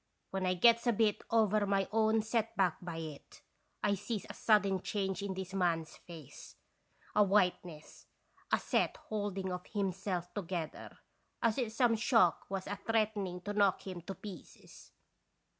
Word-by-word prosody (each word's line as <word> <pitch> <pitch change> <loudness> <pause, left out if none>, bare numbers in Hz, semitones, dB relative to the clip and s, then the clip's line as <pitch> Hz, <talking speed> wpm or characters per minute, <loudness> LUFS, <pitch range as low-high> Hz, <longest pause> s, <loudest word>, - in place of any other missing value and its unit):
When 190 -1 -1
I 185 - +2
gets 235 +5 +5
a 240 - +4
bit 215 -1 +2
over 215 -2 +3
my 195 -1 +1
own 220 0 +3
set 225 0 -1
back 185 -4 +2
by 175 -2 -6
it, 155 -3 -9 0.4
I 205 - +3
sees 205 +2 -3
a - - -7
sudden 200 -4 +3
change 195 -1 -2
in 200 -1 -3
this 190 0 -6
man's 170 -4 0
face, 165 -6 -12 0.6
a 210 - +5
whiteness, 180 -5 0 0.4
a - - +5
set - - 0
holding 200 -3 -3
of 180 0 -5
him 200 -2 -1
self 185 -2 -4
together, 180 -5 -5 0.5
as 230 +2 +2
if 235 -4 -1
some 235 0 +3
shock 220 - +3
was 195 -1 -3
a 205 - -4
threaten 215 -3 0
ing 180 0 -7
to 205 +3 -4
knock 200 -2 +2
him 185 -3 -6
to 195 +3 -7
pieces. 200 -5 -12
195 Hz, 165 wpm, -33 LUFS, 180-215 Hz, 0.6 s, gets